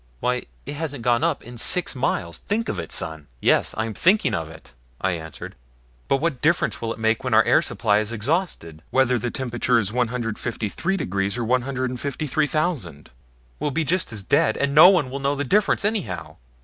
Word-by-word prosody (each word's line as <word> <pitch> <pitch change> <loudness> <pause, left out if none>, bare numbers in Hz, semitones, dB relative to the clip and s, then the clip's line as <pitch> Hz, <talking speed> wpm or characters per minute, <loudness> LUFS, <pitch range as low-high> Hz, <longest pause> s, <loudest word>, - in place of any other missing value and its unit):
Why 125 0 -1 0.2
it 145 - -5
hasn't 145 -5 -5
gone 120 +4 +2
up 165 -3 0
in 120 0 -9
six 180 +8 +3
miles. 85 -10 -2
Think 220 +2 -2
of - - -3
it, - - -6
son!" 80 -2 -3
"Yes, - - +2
I'm 110 0 -2
thinking 185 - +3
of 80 -4 -2
it," 80 0 -14 0.3
I 95 - 0
answered; 80 -2 -7 0.5
"but 135 - +3
what 145 -3 -2
difference 160 +4 +1
will 115 -1 -2
it - - -5
make 110 0 0
when - - +1
our - - +7
air - - +4
supply 105 0 +1
is 110 +1 -3
exhausted 115 - -2
whether 130 -2 +2
the 120 +2 -2
temperature 120 -1 0
is 105 -2 -1
153 120 - -2
degrees 100 - -2
or 120 - -2
153,000? 130 - -1 0.5
We'll 150 - -1
be 160 +3 0
just 170 +1 -1
as 105 -3 -6
dead, 145 - +2
and 140 0 0
no 155 +5 +10
one 165 -10 +2
will 140 - -4
know 140 +1 0
the 145 - -2
difference, 200 +6 +2
anyhow." 205 - -3
125 Hz, 190 wpm, -23 LUFS, 110-150 Hz, 0.5 s, no